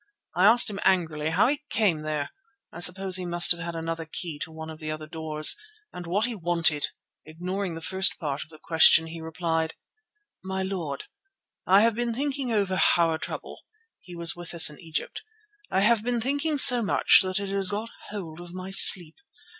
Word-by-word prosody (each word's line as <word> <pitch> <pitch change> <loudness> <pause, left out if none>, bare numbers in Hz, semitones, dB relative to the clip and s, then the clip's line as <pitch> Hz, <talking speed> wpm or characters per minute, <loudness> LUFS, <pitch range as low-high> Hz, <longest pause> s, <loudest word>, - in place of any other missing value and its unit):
I 180 - +2
asked 230 +3 +6
him 200 -2 -4
angrily 160 -5 -1
how 180 +7 +1
he 290 +2 -2
came 190 -11 0
there 155 -2 -5 0.4
(I 175 - -10
suppose 185 +1 +3
he 185 - -5
must 175 0 +5
have 175 - +1
had 170 0 -7
another 165 0 -5
key 165 -5 -5
to 160 - -7
one 160 0 -9
of 155 - -13
the 155 -1 -7
other 155 0 -6
doors) 155 -1 +2 0.4
and 175 -1 -9
what 200 +6 -1
he 245 - -4
wanted. 170 -6 0 0.4
Ignoring 180 +3 -6
the 165 - -9
first 190 +3 +1
part 145 -5 -5
of - - -22
the 155 - -15
question 160 0 +4
he 165 0 -10
replied: 160 0 -4 0.7
"'My 190 0 -4
lord, 175 -8 -6 0.6
I 195 +2 +5
have 230 +1 +2
been 235 +1 -4
thinking 275 -1 -4
over 200 -4 -1 0.2
our 165 -2 0
trouble'—he 435 - -12
was 170 -1 +2
with 175 0 -7
us 160 -2 +6
in 150 - -15
Egypt—'I 415 - -7
have 225 +1 +2
been 240 0 -2
thinking 285 +5 -2
so 250 -3 +6
much 205 - +3
that 185 0 -2
it 200 -1 -6
has 195 -1 0
got 215 +3 -2
a - - -19
hold 175 -6 -9
of 175 0 -12
my 185 +1 -8
sleep. 180 - +7
180 Hz, 195 wpm, -24 LUFS, 160-210 Hz, 0.7 s, sleep